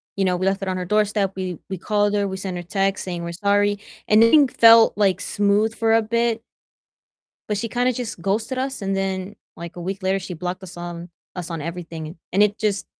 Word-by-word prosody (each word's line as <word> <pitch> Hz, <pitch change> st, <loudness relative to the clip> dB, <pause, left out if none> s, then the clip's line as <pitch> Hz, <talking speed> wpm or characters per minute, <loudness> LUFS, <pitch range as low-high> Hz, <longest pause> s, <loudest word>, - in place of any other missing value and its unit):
You 195 Hz, -, 0 dB
know, 180 Hz, -1 st, +1 dB
we 185 Hz, -, -2 dB
left 195 Hz, +1 st, 0 dB
it 195 Hz, -, -4 dB
on 185 Hz, 0 st, -1 dB
her 180 Hz, -, -3 dB
doorstep, 210 Hz, -1 st, +1 dB
we 185 Hz, -3 st, -4 dB
we 190 Hz, -, -3 dB
called 205 Hz, +2 st, 0 dB
her, 200 Hz, -1 st, +1 dB
we 190 Hz, 0 st, -4 dB
sent 190 Hz, -1 st, -5 dB
her -, -, -4 dB
texts 195 Hz, +2 st, -1 dB
saying 175 Hz, -2 st, -4 dB
we're 170 Hz, -, -4 dB
sorry. 205 Hz, +2 st, +1 dB, 0.3 s
And 215 Hz, +1 st, +6 dB
everything 280 Hz, +4 st, +6 dB
felt, 230 Hz, -2 st, +6 dB
like, 195 Hz, -3 st, +2 dB
smooth 205 Hz, +2 st, +1 dB
for 225 Hz, -1 st, +2 dB
a 225 Hz, -, +4 dB
bit 230 Hz, 0 st, 0 dB, 1.1 s
but 210 Hz, -, 0 dB
she 230 Hz, +3 st, -2 dB
kinda 245 Hz, +2 st, +1 dB
just 225 Hz, -7 st, -5 dB
ghosted 220 Hz, +7 st, -1 dB
us 265 Hz, -3 st, -3 dB
and 195 Hz, 0 st, -1 dB
then, 190 Hz, +1 st, -3 dB, 0.2 s
like 170 Hz, 0 st, -8 dB
a 175 Hz, -, -7 dB
week 190 Hz, +2 st, -5 dB
later, 190 Hz, +1 st, +1 dB
she 180 Hz, -1 st, -7 dB
blocked 180 Hz, +3 st, -4 dB
us 180 Hz, -1 st, -10 dB
on 175 Hz, 0 st, -7 dB, 0.3 s
us 180 Hz, -1 st, -5 dB
on 165 Hz, -2 st, -4 dB
everything, 165 Hz, -1 st, -6 dB
and 160 Hz, -, -10 dB, 0.2 s
and 200 Hz, +3 st, +4 dB
it 205 Hz, 0 st, +1 dB
just 210 Hz, -2 st, -1 dB
195 Hz, 230 wpm, -22 LUFS, 180-215 Hz, 1.1 s, And